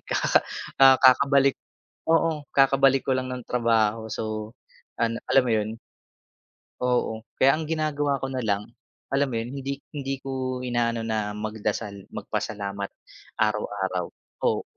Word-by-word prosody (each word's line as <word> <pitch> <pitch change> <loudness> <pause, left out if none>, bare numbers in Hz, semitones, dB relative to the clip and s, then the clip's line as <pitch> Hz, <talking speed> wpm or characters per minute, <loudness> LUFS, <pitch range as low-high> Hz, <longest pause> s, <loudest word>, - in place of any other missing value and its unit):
kaka - - +2 0.4
ah, 135 -1 +8
kakabalik 140 +1 +5 0.6
oo 165 -2 +2
kakabalik 135 0 +5
ko 130 - +3
lang 130 0 -3
nung 125 -2 -6
trabaho, 115 -2 +1
so 110 0 -4 0.5
ano 115 0 +1 0.2
alam 135 - +6
mo - - +2
'yun. 110 -1 +1 1.1
Oo, 120 -3 0
kaya 135 - +5
ang 160 - -4
ginagawa 150 -3 0
ko 135 - -2
na 130 - -2
lang, 105 -4 0 0.5
alam 140 +1 +2
mo 125 - -4
'yun, 115 +2 -3
hindi 140 0 -5
hindi 135 -2 -3
ko 130 -1 -3
inaano 120 -2 0
na 110 -2 -2
magdasal, 105 -1 -4
magpasalamat 100 -1 -4 0.5
araw-araw. 100 -4 -1 0.4
Oo, - - +1
125 Hz, 135 wpm, -25 LUFS, 110-135 Hz, 1.1 s, ah